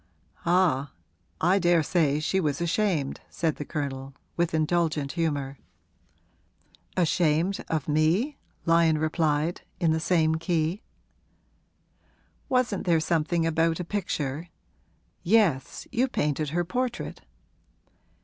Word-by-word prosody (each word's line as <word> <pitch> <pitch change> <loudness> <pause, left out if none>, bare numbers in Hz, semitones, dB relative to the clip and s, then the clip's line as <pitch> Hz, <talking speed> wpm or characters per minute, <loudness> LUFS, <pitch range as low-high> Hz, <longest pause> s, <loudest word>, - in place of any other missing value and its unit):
'Ah, 170 -6 +2 0.5
I 185 +4 +3
daresay 165 -4 +2
she 180 +5 0
was 150 -5 0
ashamed,' 170 -4 0
said 160 -3 -1
the - - -4
Colonel, 135 -3 -4 0.2
with 170 0 +1
indulgent 155 -3 +1
humour. 145 -5 -2 1.4
'Ashamed 170 +1 +2
of 155 -3 -1
me?' 165 - +2 0.3
Lyon 165 -2 +4
replied, 155 +1 0 0.2
in 165 -2 +3
the 160 - +1
same 160 -2 +2
key. 165 +3 0 1.7
'Wasn't 250 -8 0
there 165 -2 +4
something 165 +1 +1
about 165 +1 +1
a - - -2
picture? 165 -5 -3 0.7
Yes; 175 -9 +2
you 250 +3 +2
painted 150 - -1
her 175 +3 0
portrait.' 245 +6 -3
165 Hz, 105 wpm, -27 LUFS, 150-175 Hz, 1.7 s, Lyon